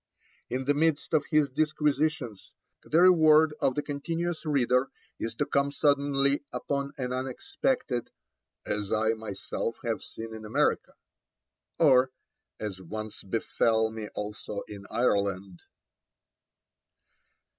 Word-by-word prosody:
In 130 +2 -2
the 145 - +3
midst 155 +1 +1
of 150 -2 +2
his 150 -2 +3
disquisitions, 150 - -1 0.3
the 165 +3 +2
reward 160 -3 +6
of 130 - +1
the 150 - -1
continuous 165 +3 -3
reader 130 -2 +2 0.3
is 115 0 -4
to - - 0
come 140 0 +1
suddenly 140 -1 +2
upon 140 0 -2
an 125 -2 -2
unexpected 135 - -2 0.6
'as 105 -1 -2
I 110 +1 +2
myself 110 +1 -3
have 115 -2 -1
seen 115 0 -8
in 110 0 -8
America,' 105 +1 0 0.8
or 130 -5 +5 0.5
'as 100 -3 -5
once 110 +4 -6
befell 110 +2 +1
me 110 -1 -6
also 105 0 -5
in 100 -1 -10
Ireland.' 100 -6 0
130 Hz, 115 wpm, -28 LUFS, 110-150 Hz, 0.8 s, reward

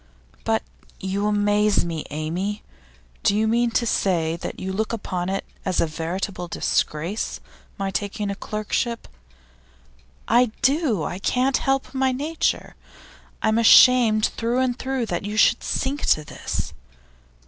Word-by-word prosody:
'But 220 0 +1 0.4
you 195 +2 -1
amaze 205 -1 +2
me, 165 -3 -4
Amy. 175 +8 -3 0.6
Do 200 - +2
you 220 +1 +2
mean 235 +2 +2
to 240 - 0
say 170 -7 +1
that 170 - -6
you 190 0 -4
look 220 +3 -1
upon 185 -5 -3
it 195 +1 -2 0.2
as 185 -2 0
a - - +4
veritable 175 +4 -4
disgrace, 170 +4 -1 0.4
my 195 0 -2
taking 205 +1 -3
this 200 - -4
clerkship?' 220 +2 -2 1.2
'I 240 +2 +5 0.2
do. 270 - +2
I 175 - -4
can't 255 +6 +1
help 270 0 -1
my 265 -1 +2
nature. 300 +5 -1 0.7
I - - +3
am 220 +1 +2
ashamed 230 -2 +7
through 235 +2 -1
and 255 -1 0
through 265 -2 -1
that 175 -4 -3
you 210 +2 -4
should - - +4
sink 280 +2 -2
to 155 - +3
this. - - -4
210 Hz, 145 wpm, -23 LUFS, 185-240 Hz, 1.2 s, ashamed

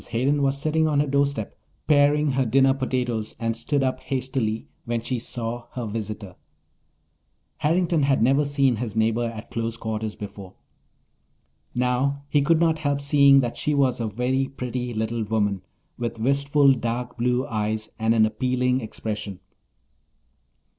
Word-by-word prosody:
Hayden 135 +5 +1
was 135 0 +1
sitting 155 +2 +1
on 150 -2 +2
her 145 - +3
doorstep, 140 -5 -1 0.3
paring 145 0 +4
her 135 0 +1
dinner 135 +3 +4
potatoes, 125 -4 -2
and 115 -1 -1
stood 140 +4 0
up 130 -1 0
hastily 130 -4 -2 0.2
when 115 0 -1
she 120 +2 -3
saw 120 0 -5
her 125 -2 -4
visitor. 105 -3 -5 1.2
Harrington 165 +1 +1
had 140 -1 +2
never 135 +5 +3
seen 140 -4 +2
his 115 -2 -4
neighbour 110 +2 +1
at 115 -1 -7
close 115 0 -3
quarters 110 -1 -4
before. 100 -2 -9 1.2
Now 125 +3 0
he 145 0 +3
could 160 +3 +3
not 165 -1 +2
help 145 -2 0
seeing 140 -1 +5
that 120 -2 -3
she 150 - 0
was 135 -3 +2
a 115 - -1
very 125 +5 0
pretty 125 -2 -4
little 110 +1 -2
woman, 105 -3 0 0.4
with 120 -1 -3
wistful, 140 +3 +3
dark 120 0 -3
blue 125 +2 +1
eyes 110 -3 -2
and 110 +1 +2
an 110 -1 +5
appealing 125 +3 0
expression. 105 -3 -5
125 Hz, 150 wpm, -24 LUFS, 115-140 Hz, 1.2 s, seeing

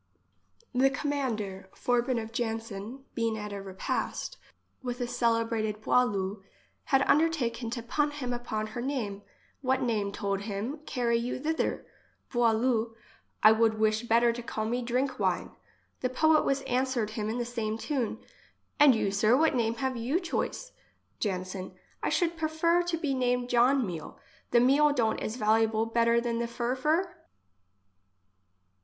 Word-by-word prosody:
55 250 - +1
The 270 +1 +3
commander 220 -10 -2
Forbin 245 0 +1
of 220 0 -6
Janson, 225 +1 -4
being 230 -2 -1
at 210 -1 -5
a 200 - -5
repast 195 - -3 0.5
with 250 -1 -4
a 245 - 0
celebrated 230 -3 0
Boileau, 205 -4 +1 0.4
had 270 -1 +3
un 295 - +5
dertaken 255 -8 0
to 235 0 -4
pun 295 +5 +1
him 270 -4 -4
upon 230 -3 -3
her 240 - -3
name: 235 -7 -3
— - - -33
" - - -40
What 260 0 +1
name, 215 -5 0
told 200 -1 -2
him, 215 +8 -4
carry 235 -2 +1
you 240 +2 -2
thither? 320 +4 -1 0.5
Boileau: 230 -1 +2 0.5
I 215 - +9
would 220 0 +3
wish 215 0 +2
better 235 0 +3
to 240 - -6
call 220 -2 -3
me 240 +3 -1
Drink 255 +2 -1
wine." - - 0 0.5
The 255 - 0
poet 310 +4 +3
was 275 0 +1
answered 255 -4 0
him 215 -1 -3
in 225 - -2
the 240 - -1
same 225 -2 -3
tune: 240 -3 -2 0.2
— - - -30
" - - -44
And 290 -4 +8
you, 200 -3 0
sir, 215 +5 +4
what 320 +2 +3
name 230 -2 +1
have 265 0 -2
you 245 +8 0
choice? 390 +7 -3 0.5
Janson: 185 -2 -3 0.3
I - - 0
should 340 -2 +1
prefer 325 +2 +2
to 350 -1 -1
be 300 -4 -1
named 250 -1 0
John 250 +2 +4
Meal. 170 -5 -6 0.3
The 235 - +5
meal 285 +4 +5
don't 225 -5 +1
is 215 - -3
valuable 220 -1 +2
better 235 +1 +3
than 235 -1 -1
the 235 - -1
furfur?" 255 +9 0
235 Hz, 165 wpm, -29 LUFS, 220-265 Hz, 0.5 s, I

